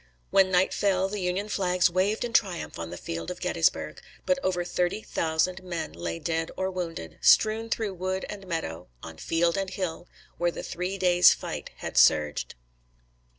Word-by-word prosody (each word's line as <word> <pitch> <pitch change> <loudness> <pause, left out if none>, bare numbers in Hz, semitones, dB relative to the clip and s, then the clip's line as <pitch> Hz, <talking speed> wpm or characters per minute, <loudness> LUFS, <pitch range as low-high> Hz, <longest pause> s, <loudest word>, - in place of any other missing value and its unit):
When 190 -1 +5
night 185 0 +3
fell, 190 -2 +1
the 205 +1 -4
Union 185 +3 -1
flags 180 -3 +2
waved 190 +6 0
in 235 - -6
triumph 185 - 0
on 85 0 -5
the 90 - -7
field 85 -1 -5
of - - -6
Gettysburg; - - 0 0.2
but 275 0 +2
over 180 -4 0
thirty 175 +4 -1
thousand 165 +3 0
men 170 - -4
lay 85 0 -4
dead 165 - -2
or 190 0 -1
wounded, 165 - -5
strewn 220 +1 +4
through 220 -3 -1
wood 185 +1 -3
and 195 -2 -8
meadow, 90 - -4 0.2
on 80 -1 -9
field 170 - +1
and 195 -1 -1
hill, 180 -3 -4 0.3
where 175 0 +2
the - - -6
three 180 +3 -3
days' 180 -1 +6
fight - - -6
had - - -1
surged. 75 -1 +3
180 Hz, 175 wpm, -27 LUFS, 165-190 Hz, 0.3 s, days